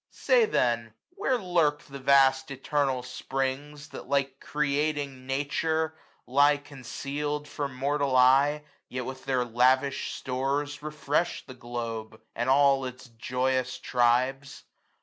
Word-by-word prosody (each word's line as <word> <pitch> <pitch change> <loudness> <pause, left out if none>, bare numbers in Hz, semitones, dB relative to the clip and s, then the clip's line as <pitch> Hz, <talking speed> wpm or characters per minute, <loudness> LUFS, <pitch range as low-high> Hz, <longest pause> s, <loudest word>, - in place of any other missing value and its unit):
770 - - -36 0.3
Say - - -11
then, 115 -2 +1 0.2
where 260 - 0
lurk 170 -6 +1
the 140 0 -10
vast 135 0 +4
eternal 135 -1 -1
springs. 135 +3 -4
That, - - -10
like 135 -1 0
creating 145 -2 -2
Nature, 160 +4 0 0.3
lieconceal'd 145 +1 0
From 140 -3 -4
mortal 140 0 0
eye, 135 +4 +5 0.3
yet 125 -1 -4
with 130 0 -7
their 130 -2 +1
lavish 130 +3 +2
stores 140 +3 -2
Refresh 150 +2 -1
the 130 - -10
globe, 115 -3 -6
and 120 +2 -2
all 135 0 +4
its 125 0 -8
joyous 125 +2 -1
tribes 130 +3 0
135 Hz, 120 wpm, -28 LUFS, 130-145 Hz, 0.3 s, eye